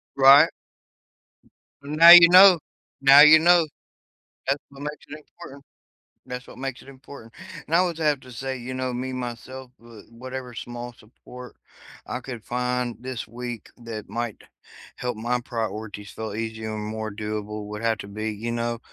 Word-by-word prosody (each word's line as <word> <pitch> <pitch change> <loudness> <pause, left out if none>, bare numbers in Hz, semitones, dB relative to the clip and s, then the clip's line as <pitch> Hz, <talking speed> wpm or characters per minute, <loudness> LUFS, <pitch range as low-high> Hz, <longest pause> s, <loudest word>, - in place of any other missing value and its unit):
Right. 140 +4 +7 1.3
Now 155 +4 +6
you 175 -1 +11
know. 185 0 +8 0.4
Now 140 +1 +8
you 155 +1 +9
know. 170 0 +4 0.8
That's 140 +1 -1
what 140 0 -13
makes 150 0 -7
it 150 - -7
important. 140 -2 -14 0.6
That's 125 +1 -7
what - - -13
makes 135 -1 -5
it - - -20
important. 130 -3 -14 0.3
And 165 - -1
I 170 - +5
always 175 -3 0
have 150 -3 0
to 125 - -14
say, 130 +3 -5
you 125 +2 -7
know, 130 -1 -3
me, 130 +2 -4
myself, 125 +1 -7
wha 115 -3 -15
whatever 125 +1 -8
small 120 0 -8
support 125 +3 -14 0.5
I - - -5
could 125 -3 -9
find 125 -1 -2
this 125 -2 -6
week 120 -1 -8
that 110 -3 -7
might 120 -2 -4 0.6
help 125 -3 -4
my 120 +2 -1
priorities 110 -3 -6
feel 110 -2 -7
easier 110 -1 -5
and 105 0 -5
more 110 0 -5
doable 105 0 -6
would 105 +1 -7
have 115 -1 0
to 100 - -8
be, 110 +2 -5
you 115 +3 -5
know, 120 0 -3
125 Hz, 165 wpm, -24 LUFS, 110-135 Hz, 1.3 s, you